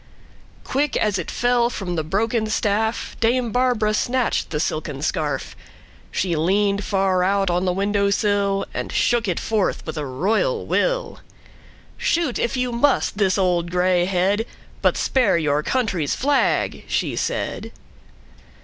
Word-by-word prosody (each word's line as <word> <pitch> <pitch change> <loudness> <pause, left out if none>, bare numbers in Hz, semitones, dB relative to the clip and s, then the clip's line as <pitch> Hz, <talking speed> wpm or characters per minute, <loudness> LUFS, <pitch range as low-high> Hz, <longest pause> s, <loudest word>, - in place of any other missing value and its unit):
Quick, 285 +1 0
as 205 -3 +1
it 170 - -5
fell, 245 -1 +2
from 190 -7 -4
the 160 - -1
broken 215 +7 0
staffDame 225 +3 0
Barbara 245 -4 +2
snatched 245 +3 0
the 150 - -2
silken 150 -2 -3
scarf; 150 -3 -2 0.5
She 180 -3 -1
leaned 200 +5 +1
far 190 -2 +1
out 195 0 +1
on 175 +2 0
the 180 - +2
window 200 +2 +1
sill, 200 -1 +1
And - - -4
shook 235 -2 +1
it 180 - -1
forth 215 -3 -1
with 160 -1 -4
a 150 - -3
royal 220 - 0
will."Shoot, 345 - -3
if 235 +3 -1
you 250 -1 0
must, 240 -3 +1
this 190 -2 +2
old 175 -3 +1
gray 180 0 +2
head, 195 +4 +1 0.3
But - - +2
spare 240 -9 +2
your 150 -2 +1
country's 195 - -1
flag," 285 +2 +1
she - - -1
said. - - -3
200 Hz, 140 wpm, -22 LUFS, 180-235 Hz, 0.5 s, fell